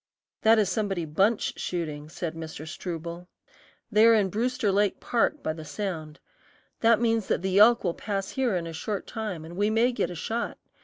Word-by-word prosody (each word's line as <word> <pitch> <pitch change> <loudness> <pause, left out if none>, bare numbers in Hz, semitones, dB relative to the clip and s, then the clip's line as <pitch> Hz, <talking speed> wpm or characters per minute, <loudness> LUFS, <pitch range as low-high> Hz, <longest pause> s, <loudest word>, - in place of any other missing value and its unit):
"That 225 +1 +6
is 210 -2 +3
somebody 195 -5 -1
bunch 195 +9 +1
shooting," 155 -4 -4
said 165 0 -4
Mr. 160 -1 -7
Struble. 170 +1 -6 0.6
"They 215 +1 +6
are 230 - +7
in 200 -3 +2
Brewster 225 +1 0
Lake 200 0 +1
Park, 265 +5 0
by 155 - -1
the 160 0 -8
sound. 160 -3 -5 0.6
That 230 -1 +4
means 225 -3 +1
that - - 0
the 190 +1 +2
elk 235 +3 +7
will 175 -3 0
pass 195 -1 -3
here 255 -7 0
in 170 -2 -2
a 165 - -6
short 200 +5 -4
time 210 -8 -5
and 170 +2 -9
we 205 +3 +1
may 230 +3 +3
get 240 - -1
a 175 - -6
shot. 225 +8 -3
195 Hz, 195 wpm, -27 LUFS, 170-225 Hz, 0.6 s, are